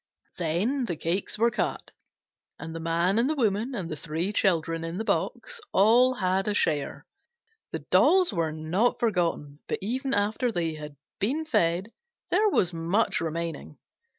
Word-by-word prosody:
Then 195 - 0
the 175 - -3
cakes 170 +6 -2
were 235 +2 +3
cut, - - -3 0.7
and 165 - -7
the 165 - -5
Man 170 +5 +1
and 245 +4 +2
the 310 - 0
Woman 230 0 0
and 190 -6 -3
the 160 - -4
three 165 +6 -3
children 165 -4 +1
in 165 +2 -4
the 220 - -2
box 475 - -2
all 240 +6 +5
had 190 -1 0
a 210 - 0
share. 150 -7 0 0.7
The - - -5
dolls 370 - +5
were 165 -3 0
not 160 +10 0
forgotten, 170 - -1
but - - -1
even 260 +6 -2
after 215 +4 0
they 170 -5 -1
had 150 -1 -8 0.2
been 280 +11 0
fed 180 - +1 0.4
there 430 0 +4
was 180 - +1
much 170 +7 0
remaining. 165 +1 -4
190 Hz, 160 wpm, -27 LUFS, 165-230 Hz, 0.7 s, all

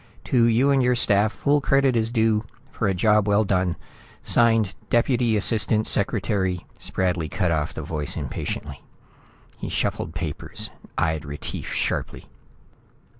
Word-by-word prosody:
To 120 -3 +3
you 120 +5 +3
and 135 -1 +3
your 125 0 +3
staff, 105 -3 +3
full 145 +4 +1
credit 135 -2 +3
is 115 -1 +1
due 110 -2 +2 0.3
for 110 - -1
a 95 - +2
job 105 +2 +3
well 105 +1 +4
done. 90 -3 0 0.5
Signed, 115 -4 +3 0.2
Deputy 120 -2 +2
Assistant 110 0 +1
Secretary 100 -3 0
" - - -29
Spradley 90 -4 -1
cut 90 -4 0
off 80 -1 -1
the 80 - -5
voice 75 0 -3
impatiently. - - -5 0.8
He - - -5
shuffled 80 - -2
papers, 80 -3 -5 0.3
eyed 80 -2 0
Retief 75 -1 -6
sharply. - - -3
105 Hz, 140 wpm, -24 LUFS, 90-115 Hz, 0.8 s, well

